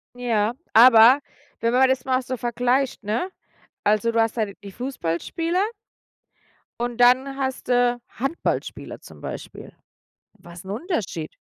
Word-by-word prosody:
Ja, 230 -2 0 0.2
aber 235 +3 +8 0.4
wenn 230 0 +1
man 260 +1 +5
das 260 -1 0
mal 260 0 +1
so 255 0 -4
vergleicht, 245 +1 0
ne? 225 - -2 0.5
Also, 215 +3 +2
du 230 - 0
hast 225 +1 -1
da 220 - +1 0.2
die 200 - -9
Fußballspieler 265 - -2 1.2
und 240 -1 -2
dann 260 +3 +4
hast 265 -2 -4
du 245 -1 +2
Handballspieler 270 +8 -4
zum - - -14
Beispiel. - - -8 0.7
Was 175 +1 -13
'n 190 - -8
Unterschied? 215 - -4
245 Hz, 130 wpm, -23 LUFS, 220-260 Hz, 1.2 s, aber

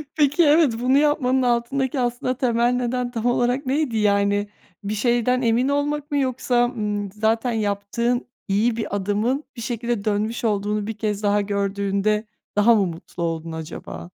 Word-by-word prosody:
Peki, 295 +2 +3
evet, 300 -4 +5
bunu 260 +3 +3
yapmanın 275 -3 +2
altındaki 255 +3 0
aslında 245 +1 -1
temel 240 -2 +2
neden 250 0 -1
tam 230 -2 -4
olarak 245 +3 +1
neydi? 265 -3 0
Yani, 205 0 +2 0.3
bir 205 +2 -2
şeyden 240 +3 +1
emin 240 +3 +2
olmak 290 +1 -1
mı 290 - +1
yoksa, 255 -2 +1
ımm, 210 -4 -3
zaten 225 +3 0
yaptığın 225 +4 -1 0.2
iyi 215 +4 +2
bir 220 -3 -3
adımın 210 +8 0
bir 235 - -7
şekilde 235 -2 -2
dönmüş 215 +3 -1
olduğunu 210 -1 0
1 220 -1 -5
kez 210 -1 -2
daha 205 0 +3
gördüğünde 200 +1 0 0.3
daha 230 +3 +5
mı 200 -3 +3
mutlu 170 0 -6
oldun 165 0 -3
acaba? 160 +1 -7
235 Hz, 155 wpm, -22 LUFS, 205-250 Hz, 0.3 s, evet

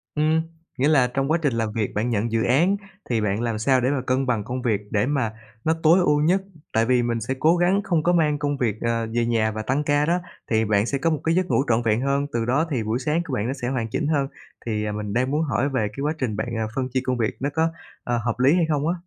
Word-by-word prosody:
Ừm, 155 +1 +2 0.4
nghĩa 135 +3 +2
là 140 -5 +4
trong 135 +4 -1
quá 165 - +4
trình 145 -5 +1
làm 115 -2 -1
việc 105 -1 -2
bạn 110 +3 -1
nhận 115 0 -1
dự 115 0 +1
án 170 +11 +3 0.3
thì 115 -3 +1
bạn 105 +1 0
làm 115 -2 -1
sao 130 +3 +3
để 125 - +1
mà 140 -2 0
cân 130 +1 +1
bằng 120 -5 0
công 125 +3 -4
việc 110 -5 0
để 105 +1 +2
mà 130 -6 -1 0.3
nó 160 - +2
tối 165 +4 +6
ưu 150 -4 +3
nhất. 180 +5 +3 0.3
Tại 115 0 +3
vì 125 0 +3
mình 115 -1 -1
sẽ 115 +5 -2
cố 160 +3 +4
gắng 180 +3 +2
không 170 -6 0
có 175 - +3
mang 150 -4 +2
công 145 -1 -1
việc, 115 -6 0
ờ, 115 -1 0
về 120 -1 +2
nhà 115 -2 +1
và 110 0 -4
tăng 135 +6 0
ca 145 0 +2
đó, 170 +3 +1 0.3
thì 110 0 +3
bạn 105 -1 +2
sẽ 140 - -1
có 165 +5 +1
một 155 -2 0
cái 165 +1 +1
giấc 185 0 +2
ngủ 135 - +2
trọn 115 0 +3
vẹn 110 +1 +2
hơn. 140 +1 +1
Từ 115 -1 0
đó 135 +7 +2
thì 125 -6 0
buổi 110 +3 -1
sáng 150 +5 0
của 145 - -6
bạn 110 -2 -1
nó 130 - -1
sẽ 120 - -1
hoàn 120 -4 -1
chỉnh 145 +6 -1
hơn. 145 -3 +1 0.4
Thì 105 -2 -2
mình 105 -1 -4
đang 130 +4 +1
muốn 150 - +1
hỏi 135 -1 0
về 130 -6 0 0.2
quá 150 +2 +1
trình 125 -7 -2
bạn 110 +4 -3 0.3
phân 130 -1 -1
chia 130 - +1
công 125 -1 -1
việc 115 -2 -1
nó 140 +2 -1
có, 160 +2 +2 0.3
ờ, 120 0 0
hợp 115 +1 -2
lý 135 +4 +5
hay 175 -2 +3
không 150 0 0
á? 170 - +2
130 Hz, 285 wpm, -23 LUFS, 115-150 Hz, 0.4 s, tối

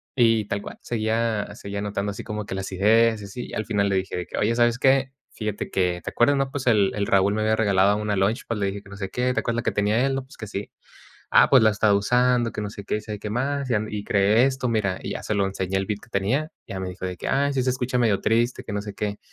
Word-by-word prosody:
y 115 -4 +3
tal 100 0 -3
cual - - -9
seguía 110 -1 -1
seguía 100 -2 -7
anotando 100 0 -2
así 100 - -6
como 105 0 -4
que - - -4
las 95 0 -4
ideas 110 +3 +3
y - - -7
así, 120 +5 -8
al 110 - -3
final 100 -2 +1
le 95 - +1
dije 95 -1 -3
de 90 - -3
que: - - -8
"Oye, 115 +3 +1
¿sabes 120 0 +2
qué? 135 0 +3 0.2
Fíjate 105 -2 -4
que, 90 -2 0
¿te - - -3
acuerdas, 130 +4 +3
no? 135 -1 0
Pues, 135 -3 -4
el 105 -4 +4
el 100 -1 0
Raúl 100 +1 +3
me 110 - -1
había 110 0 +2
regalado 100 -1 +3
una 105 -1 -1
launchpad", 110 +3 0
le 100 - 0
dije 100 +1 -4
que: 100 - -16
"No 100 - -10
sé 95 -2 -4
qué. 125 +1 0
¿Te - - +2
acuerdas 115 0 -2
la - - -4
que 110 - +1
tenía 105 +5 +1
él?". 135 - 0
"No, 135 - -3
pues, 135 - -17
que 110 - -6
sí". 100 0 -6 0.6
"Ah, - - +6
pues, - - +7
la 110 - +6
he - - +2
estado 100 0 +3
usando, 125 +2 +2
que - - -4
no 105 - -3
sé 100 -1 -9
qué, - - -1
y - - -3
sabe 105 -1 -6
qué 105 - -5
más, 135 +3 -1
y, - - +2
am, 110 0 -1
y 105 -1 -4
creé 105 +5 +4
esto, 130 -2 -1
mira", 100 -5 0
y - - -5
ya - - -5
se 105 - -2
lo 100 -1 +2
enseñé, 95 0 -2
el 95 0 -1
beat 105 -1 -3
que - - -17
tenía. 125 +11 0 0.2
Ya 95 - -5
me 95 - -3
dijo 90 0 -7
de 90 -1 -5
que: - - -5
"Ay, 140 +1 +1
sí 130 -2 0
se 130 - +1
escucha 125 0 -2
medio 110 -5 +2
triste, 120 +2 +1
que - - -6
no 100 0 -2
sé 105 -2 -7
qué". 105 0 -3
105 Hz, 300 wpm, -24 LUFS, 100-120 Hz, 0.6 s, pues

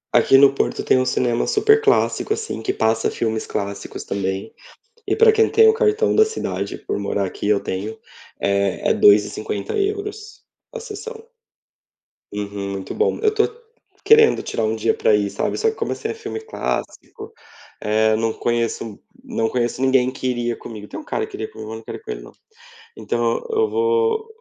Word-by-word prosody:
A - - +8
aqui 135 - +5
no 140 0 +6
Porto - - -1
tem - - +3
um 130 - +1
cinema 120 -2 +1
super 430 +1 +4
clássico 425 0 +2
assim 445 +1 -5
que 385 - -1
passa 110 0 +1
filmes 110 -1 -2
clássicos 100 0 -5
também. 95 +1 -3 0.5
E - - +1
pra 445 0 +6
quem 440 0 +3
tem 445 0 +6
o 440 - +5
cartão 445 -1 +2
da 435 - +6
cidade, 100 - -4
por - - -4
morar 100 0 -1
aqui, 95 - -5
eu 105 -1 +4
tenho, 105 +4 -5 0.4
é 100 -1 0
é - - +4
2,50 105 0 +2
euros 415 +1 -4 0.3
a 485 - -5
sessão. 450 +1 -8 1.1
Uhum, 100 -1 -4
muito 95 -1 -5
bom. 445 - +1
Eu 445 - +3
estou 435 0 +2 0.6
querendo 450 0 +6
tirar 115 - -2
um 110 +1 0
dia 110 - +1
pra 110 - +2
ir, 100 -1 +1
sabe? 100 - -2
Só 450 - +1
que 445 - -10
como - - -2
esse 440 - -4
é 450 - -3
filme 440 -1 -6
clássico, 445 0 -5 0.5
eh, 110 +1 +2
eu - - +3
não 115 0 0
conheço 115 -2 -2 0.3
não 115 0 -1
conheço 120 +1 -1
ninguém 130 -1 +3
que 130 - -5
iria 120 -1 -1
comigo, 105 -2 -9
tem - - -7
um - - -12
cara - - -2
que - - -17
iria 110 - -5
comigo, 110 0 -9
mas 110 - -6
não 115 - -14
quero - - -7
ir - - -20
com 445 - -9
ele 430 - -5
não. - - -13 0.6
Então - - 0
eu 445 -1 +2
vou 450 0 +1
125 Hz, 195 wpm, -21 LUFS, -, 1.1 s, A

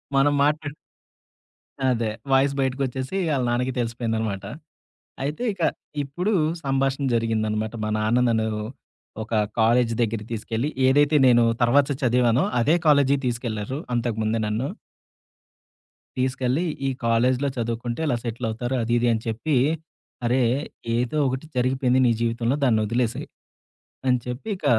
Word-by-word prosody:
మనం 145 +2 +4
మాట్లాడు 150 0 0 1.2
అదే. 115 -3 0 0.2
వాయిస్ 135 +1 +4
బయటికొచ్చేసి 130 +3 -2 0.2
ఆళ్ళ 130 - 0
నాన్నకి 125 +1 0
తెలిసిపోయిందన్నమాట. 115 -4 -2 0.8
అయితే 150 - -3
ఇక 180 -4 -7 0.4
ఇప్పుడు 175 +10 -2 0.3
సంభాషణ 135 0 0
జరిగిందన్నమాట. 110 -1 -1
మా - - -1
నాన్న 110 +3 +2
నన్ను 110 -1 +1 0.7
ఒక 110 0 -1 0.2
కాలేజీ 115 +1 +3
దగ్గరికి 110 -1 -2
తీసుకెళ్ళి 115 +4 -2 0.2
ఏదైతే 145 +3 +4
నేను 120 -1 +6 0.2
తర్వాత 135 +4 +4
చదివానో 125 0 +3 0.2
అదే 150 +8 +3
కాలేజీకి 140 -2 +4
తీసుకెళ్లారు, 120 0 -3 0.2
అంతకు 120 -2 -1
ముందే 110 +1 0
నన్ను. 110 +6 -1 1.5
తీసుకెళ్ళి 130 +3 0 0.2
ఈ - - +2 0.2
కాలేజీలో 125 +4 +2
చదువుకుంటే 120 +3 -3
ఇలా 120 - +1
సెటిలవుతారు 120 +1 -3
అది 120 - -1
ఇది 120 0 +2
అని 110 - -2
చెప్పి. 120 +7 -1 0.7
"అరే! 125 +2 +2 0.6
ఏదో 125 +5 -1
ఒకటి 130 +4 -3
జరిగిపోయింది 130 0 +2
నీ - - +4
జీవితంలో 115 +2 0
దాన్ని 110 -5 +3
వదిలేసేయ్" 120 +1 -1 0.8
అని 125 -1 +3
చెప్పి 125 - -5
ఇక - - -9
125 Hz, 125 wpm, -24 LUFS, 115-135 Hz, 1.5 s, నేను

